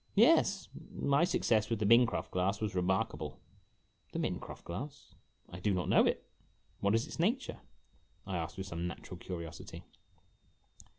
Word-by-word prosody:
"Yes. 205 - +5 0.3
My 140 +3 +3
success 110 - +2
with 115 - +1
the 105 - 0
Mincroft 115 +2 +4
glass 95 +3 +1
was 105 -3 -2
remarkable." 95 +1 -1 0.7
"The - - -2
Mincroft - - -3
glass,! 135 +12 -7 0.5
do 100 0 +2
not 90 - -1
know - - +6
it, - - -1 0.5
what 100 +2 +3
is 115 - +2
its - - -9
nature?" 235 +10 0 0.7
I 95 -2 -3
asked, 85 -1 -3
with 95 - -4
some 85 -2 -3
natural 90 +1 -7
curiosity. 85 -4 -7
100 Hz, 140 wpm, -33 LUFS, 90-140 Hz, 0.7 s, know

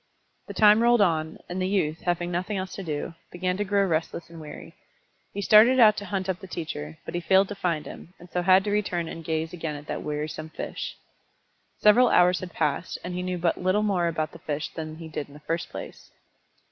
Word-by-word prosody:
The - - -8
time 210 +1 +6
rolled 240 -1 +5
on, 160 -4 +1
and 180 +1 -4
the 185 - +1
youth, 165 -5 0
having 175 0 0
nothing 185 +4 -2
else 185 0 -4
to - - -6
do, 160 -1 -4 0.2
began 180 +1 -1
to 205 - 0
grow 200 0 +2
restless 165 -1 -2
and 165 -1 -10
weary. 150 -1 -10 0.6
He 200 - -4
started 230 +5 +7
out 215 -3 +7
to 205 - -4
hunt 190 0 -2
up 185 -2 -1
the 190 - -10
teacher, 80 - -6
but - - -6
he 175 - -2
failed 190 +2 +4
to - - -3
find 170 -5 -1
him, 180 - -11
and 175 - -14
so 180 0 -2
had 185 +1 +5
to 205 - -2
return 180 -5 0
and 165 0 -7
gaze 160 +1 -2
again 165 -3 -4
at 145 0 -9
that - - -4
wearisome 150 +1 -4
fish. - - -6 0.8
Several 235 +4 +6
hours 180 0 +4
had 180 -1 -7
passed, 150 +4 -1
and 180 - -5
he 180 - -2
knew 180 0 -2
but 170 0 0
little 185 +3 +2
more 185 -5 +1
about 155 -2 -2
the 165 - -12
fish 150 -1 -3
than 155 -1 -6
he 165 0 -9
did 150 -2 -5
in 145 - -16
the - - -11
first 165 +2 -3
place. - - -9
175 Hz, 230 wpm, -26 LUFS, 160-195 Hz, 0.8 s, started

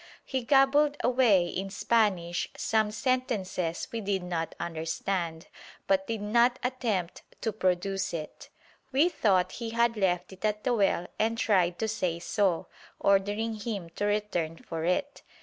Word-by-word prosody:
He 265 - -2
gabbled 285 +3 +4
away 240 -8 +4
in 190 +3 -4
Spanish 190 -5 +1
some 220 -1 +1
sentences 215 -8 -1
we 230 - -3
did 195 -2 -1
not 170 -2 -3
understand, 165 +1 -3 0.4
but 285 0 +1
did 225 -3 -3
not 240 +4 +3
attempt 230 -9 -2 0.2
to 220 - -1
produce 195 0 0
it. 155 -2 -7 0.4
We 290 +6 +4
thought 190 - +2
he 230 - -3
had 235 0 +2
left 180 -2 0
it 190 - -14
at 210 0 0
the 250 - +1
well 195 -5 +2
and 225 +1 +1
tried 180 -6 +2
to 220 - -1
say 185 -6 -1
so, 180 0 0 0.3
ordering 205 +3 +2
him 200 -6 -4
to 205 - -3
return 205 -6 -1
for 165 0 -5
it. 275 +12 -1
205 Hz, 150 wpm, -29 LUFS, 180-230 Hz, 0.4 s, gabbled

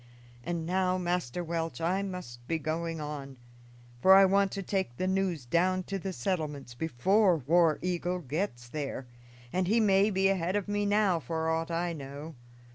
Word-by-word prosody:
And 170 +2 -3
now, 185 +1 +1
Master 175 -3 -2
Welch, 165 -1 -3
I 180 +4 0
must 180 -12 -7
be 165 - 0
going 165 +1 -3
on, 145 -3 -6 0.6
for 190 0 +8
I 195 0 +8
want 195 0 +3
to 195 - -3
take 190 -10 -2
the 185 - -1
news 185 -7 0
down 185 +7 +1
to 195 +1 -4
the 190 +1 -4
settlements 150 -5 -3
before 170 - +2
War 160 +3 +3
Eagle 180 0 -1
gets 145 -5 -3
there, 135 -1 -4 0.5
and 185 0 +1
he 225 +4 +3
may 200 -1 +4
be 195 -1 +2
ahead 185 -1 0
of 205 -1 -1
me 205 0 0
now, 205 -4 +3
for 160 +1 -3
aught 165 +1 -1
I 170 +1 -1
know. 145 +2 -8
175 Hz, 175 wpm, -30 LUFS, 155-190 Hz, 0.6 s, for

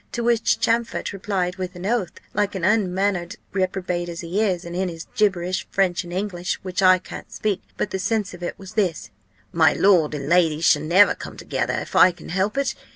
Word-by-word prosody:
To 235 - -2
which 235 -1 +2
Champfort 230 -1 0
replied 190 -2 -2
with 185 0 -5
an 180 +1 -7
oath, 215 -4 0 0.2
like 205 -1 0
an 185 - -4
unmannered 190 -1 +1 0.2
reprobate 185 -2 -1
as 170 0 -6
he 175 +5 -1
is, 185 -6 0
and 170 0 -6
in 185 0 0
his 165 -1 -8
gibberish, 185 -3 0
French 185 -3 +1
and 175 - -10
English, 180 -1 -2
which 185 0 -2
I 185 -1 +7
can't 180 - -10
speak; 210 -2 -2 0.2
but - - -2
the 190 - -2
sense 205 0 -1
of 175 - -11
it 175 - -4
was 195 +1 -11
this: 190 -7 -1 0.4
'My - - +4
lord 170 -6 +3
and 140 -1 -5
lady 165 -2 +3
shall 150 -2 +4
never 180 +6 +5
come - - -9
together, - - -2
if - - -5
I 185 - +7
can 175 - -13
help 195 +7 -1
it. 280 - +1
185 Hz, 210 wpm, -23 LUFS, 175-205 Hz, 0.4 s, I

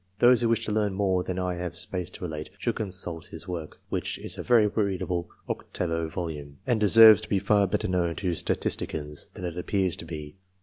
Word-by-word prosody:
Those 120 +1 +6
who 115 - +2
wish 115 - +1
to - - -2
learn 105 -2 +1
more 95 -2 +1
than 90 0 -4
I 90 -1 -1
have 90 -1 -4
space 90 0 -3
to 90 - -10
relate, 80 -3 -5
should - - -1
consult 90 -5 -4
his 100 - -10
work, 85 -4 -6
which - - -2
is - - -4
a - - -5
very 120 -3 +5
read 100 -3 0
able 85 -1 -2 0.2
octavo 85 -2 -2
volume, 75 -5 -5
and 120 -3 +2
deserves 110 0 +8
to 110 - -8
be 100 - +2
far 100 +1 +3
better 105 +3 -1
known 90 -3 0
to 90 -3 -1
statisticians 75 -2 -2
than 90 - -5
it 85 -2 -4
appears 95 -1 0
to - - -6
be. 75 0 -8
90 Hz, 215 wpm, -27 LUFS, 85-105 Hz, 0.2 s, deserves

